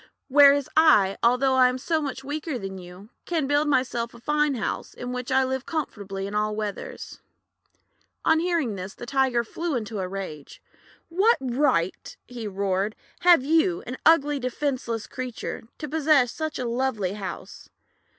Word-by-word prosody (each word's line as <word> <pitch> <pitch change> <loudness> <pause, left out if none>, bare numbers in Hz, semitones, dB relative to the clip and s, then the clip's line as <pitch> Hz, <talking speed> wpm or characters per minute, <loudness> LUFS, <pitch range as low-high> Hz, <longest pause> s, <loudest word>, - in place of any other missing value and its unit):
"Whereas 280 0 +6
I, 215 -12 +5
although 250 +3 +3
I 255 -1 +5
am 250 - -3
so 315 +5 -1
much 275 -2 -4
weaker 295 0 -4
than 195 -3 -6
you, 180 +3 -12 0.2
can 325 -5 0
build 290 +2 +2
myself 245 -4 0
a - - -12
fine 295 +2 +1
house, 225 - -4
in 245 0 -6
which 250 0 -4
I 265 0 +4
live 260 0 -3
comfortably 200 - -4
in 200 - -6
all 210 0 0
weathers." 215 - -6 1.1
On 320 0 +4
hearing 335 -9 0
this, 190 0 -7
the - - -8
Tiger 260 -2 +1
flew 330 +6 -3
into 220 -3 -3
a 185 - -2
rage. 180 -7 -7 0.5
"What 395 +8 +3
right," 255 - 0
he 235 -3 -6
roared, 200 +1 -1 0.2
"have 345 -6 +6
you 330 +4 +2
— - - -20
an 255 +2 -6
ugly, 295 -3 +4
defenceless 255 -3 -2
creature 250 -3 -6
— - - -49
to 300 - -5
possess 300 -4 +3
such 315 -1 -4
a 255 - -3
lovely 235 -6 -1
house? 200 -2 -8
255 Hz, 170 wpm, -25 LUFS, 215-295 Hz, 1.1 s, Whereas